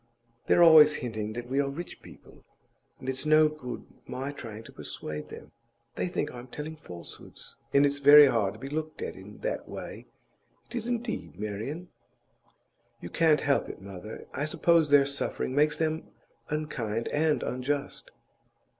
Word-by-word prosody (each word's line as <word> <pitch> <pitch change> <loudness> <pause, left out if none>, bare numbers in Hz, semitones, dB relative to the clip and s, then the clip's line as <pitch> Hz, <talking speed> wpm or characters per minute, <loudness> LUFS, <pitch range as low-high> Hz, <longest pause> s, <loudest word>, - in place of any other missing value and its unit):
They're 175 - +6
always 155 -2 +8
hinting 110 -3 -4
that 120 +1 -6
we 135 +3 0
are 140 - -1
rich 170 +6 -7
people, - - -16 0.5
and 130 - -11
it's 130 0 -2
no 155 0 +6
good 150 -5 -7 0.2
my 135 +2 -4
trying 115 -5 -8
to - - -13
persuade 75 0 -6
them. - - -11 0.4
They - - -2
think - - -2
I'm 120 0 -9
telling 150 +5 -6
falsehoods, 90 - -10 0.2
and 140 +1 +5
it's 145 0 0
very 145 +1 +10
hard 105 -7 +1
to - - -13
be 135 - -6
looked 155 +2 -4
at - - -5
in - - -12
that - - -3
way; - - -8 0.6
it - - -14
is, 235 -1 -2
indeed, 240 - -3
Marian.' 110 - -5 1.1
'You 85 - -8
can't 160 -2 +4
help 140 -1 +1
it, - - -8
mother. 100 +2 -9
I 145 - -1
suppose 165 0 +3
their 145 -1 +6
suffering 140 -2 -2
makes 150 +2 +3
them 160 0 -1 0.4
unkind 120 -8 -2
and 155 0 +1
unjust. 140 +3 -3
140 Hz, 165 wpm, -28 LUFS, 120-155 Hz, 1.1 s, very